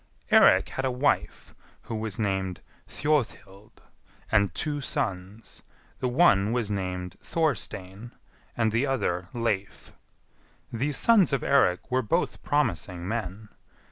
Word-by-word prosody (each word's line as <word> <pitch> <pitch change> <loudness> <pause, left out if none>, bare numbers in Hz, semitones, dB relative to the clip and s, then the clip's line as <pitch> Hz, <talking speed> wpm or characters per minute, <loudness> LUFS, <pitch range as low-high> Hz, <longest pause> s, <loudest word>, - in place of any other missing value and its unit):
4. - - +8
Eirik - - +5
had 135 - -4
a 130 - +1
wife 130 +3 -1 0.3
who - - -7
was 110 -2 -3
named 95 -3 -2 0.3
Thjodhild, 110 -9 -3 0.5
and 100 -4 +3
two 150 -2 -2
sons; 100 -3 -4 0.4
the 130 - -1
one 120 - +4
was 115 -3 -1
named 90 -2 -4
Thorstein, 115 - -2 0.5
and 115 -2 +2
the 115 +6 +1
other 95 -9 -1
Leif. 110 -5 -3 0.8
These 135 +4 -1
sons 215 -8 +4
of 135 - 0
Eirik 130 -6 +2
were 130 +1 +2
both 165 +10 -1
promising 90 - -1
men. 105 -1 -4
110 Hz, 125 wpm, -26 LUFS, 95-135 Hz, 0.8 s, 4